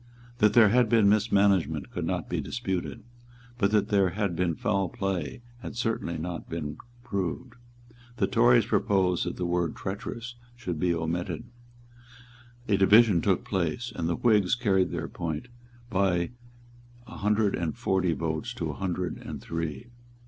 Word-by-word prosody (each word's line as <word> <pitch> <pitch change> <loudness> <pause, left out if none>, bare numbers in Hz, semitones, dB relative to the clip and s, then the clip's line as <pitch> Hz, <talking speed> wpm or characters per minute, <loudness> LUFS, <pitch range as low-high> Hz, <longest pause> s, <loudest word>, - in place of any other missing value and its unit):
That 105 -1 +4
there 115 -4 +7
had 120 +1 +3
been 110 -3 +5
mismanagement 100 -6 +2
could - - -3
not - - -2
be - - -2
disputed; 100 -1 -4 0.6
but 100 -3 +3
that 105 0 +2
there 100 -3 +3
had 100 -1 -2
been 85 -1 0
foul 100 -6 0
play 95 +2 -3 0.2
had 115 - -8
certainly 115 -7 -1
not 85 +2 -5
been 75 -2 -5 0.2
proved. 100 +6 -3 0.6
The - - +2
Tories 120 -2 +4
proposed 95 -6 +1
that 90 - -3
the 90 - -2
word 85 -2 0
"treacherous" 115 +5 -5 0.2
should 90 -9 -5
be 90 +2 +2
omitted. 85 0 -2 1.2
A 100 -3 +3
division 100 -1 +6
took - - +1
place; 95 +7 -2
and 85 0 -2
the 85 - +1
Whigs 105 -4 +3
carried 95 -7 +2
their 85 -1 -4
point 85 +7 -5 0.4
by 95 -3 +1 0.7
a - - -10
hundred 105 0 +2
and 85 -3 -2
forty 95 -3 +1
votes 80 -1 -3
to - - -3
a - - -9
hundred 90 -1 -3
and - - -7
three. 85 +5 -4
95 Hz, 155 wpm, -27 LUFS, 85-110 Hz, 1.2 s, there